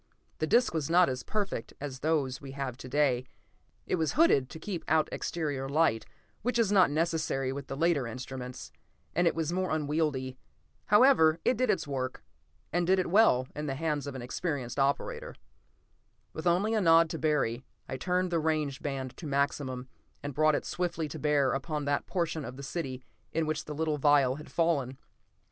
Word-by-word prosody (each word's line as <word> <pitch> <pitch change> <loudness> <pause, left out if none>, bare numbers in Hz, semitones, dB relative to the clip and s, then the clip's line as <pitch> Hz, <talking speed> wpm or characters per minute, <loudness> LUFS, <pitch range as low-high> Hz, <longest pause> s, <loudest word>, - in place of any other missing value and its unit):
The 155 - 0
disc 240 +5 +3
was 155 -3 -1
not 175 +1 +5
as 130 0 -3
perfect 200 - -3
as 135 -2 -6
those 140 -3 0
we 135 -1 -8
have 135 -3 -4
to 130 - -9
day; 130 -3 +1 0.6
it - - 0
was 160 -2 0
hooded 195 - +4
to - - -8
keep 175 +1 -5
out 155 0 +3
exterior 145 -5 -3
light, 140 -7 +2 0.3
which 245 +2 0
is 225 -4 +2
not 190 -7 +6
necessary 155 -4 0
with 140 0 -6
the 135 - -5
later 160 -5 +2
instruments, 125 +1 -7 0.4
and 175 0 +3
it - - +2
was 165 0 -1
more 185 0 0
unwieldy. 145 -4 -1 0.5
However, 210 - +6
it 255 - +3
did 255 +1 0
its 190 - +1
work, 130 -2 -3 0.5
and 175 0 +1
did 190 +1 +4
it 185 -2 -1
well, 175 - +5
in 150 +1 -4
the 135 - -2
hands 150 -1 -2
of 140 - -5
an 130 - -6
experienced 130 -2 -3
operator. 465 - -1 1.0
With - - -4
only 190 +6 +2
a 220 - +2
nod 165 -2 +6
to 160 - -4
Barry, 135 -6 0 0.2
I - - -4
turned 180 +6 0
the 170 - +2
range 155 -3 -1
band 135 -3 -4
to 160 - -7
maximum, 140 -2 -1 0.4
and 145 0 -4
brought 155 +2 +3
it - - -2
swiftly 170 -3 -2
to - - -7
bear 145 -3 +2
upon 150 +2 -3
that 145 0 0
portion 165 -4 -1
of 125 0 -7
the 140 - -8
city 135 -4 -4 0.3
in 165 0 +1
which 155 0 -2
the 150 - -6
little 155 -1 -1
vial 140 -2 +4
had 150 - -10
fallen. 145 -6 0
150 Hz, 190 wpm, -30 LUFS, 135-170 Hz, 1.0 s, not